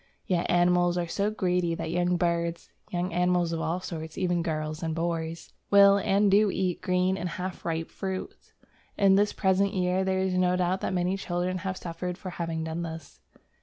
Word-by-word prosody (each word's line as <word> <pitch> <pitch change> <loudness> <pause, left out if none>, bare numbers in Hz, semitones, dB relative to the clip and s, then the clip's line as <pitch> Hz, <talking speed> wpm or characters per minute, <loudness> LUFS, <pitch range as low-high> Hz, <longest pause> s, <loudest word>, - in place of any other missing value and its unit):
Yet 175 -2 0
animals 175 0 +3
are 175 - 0
so 200 +5 0
greedy 180 -5 0
that 160 - -4
young 175 +1 +1
birds, 170 -1 -1 0.2
young 180 0 -2
animals 180 -1 +2
of 165 - -2
all 170 +3 -1
sorts 160 -3 -6
(even 175 -2 +1
girls 155 -1 -3
and 160 -2 -2
boys) 165 -1 -3 0.2
will 200 0 +7
and 200 0 +2
do 205 +1 +5
eat 185 -2 -1
green 185 +1 +1
or 180 - -2
half 185 +1 -5
ripe 165 -1 -3
fruit. 190 -1 -6 0.5
In 195 -1 +5
this 205 +2 +3
present 195 +1 +1
year 180 0 +1
there 190 0 0
is 190 0 0
no 180 0 +2
doubt 180 +1 0
that - - -1
many 180 +2 0
children 180 0 -2
have 190 0 -4
suffered 175 +1 -5
for 185 - -7
having 165 -2 -3
done 160 +1 -3
this. 160 -3 -7
180 Hz, 190 wpm, -27 LUFS, 170-190 Hz, 0.5 s, will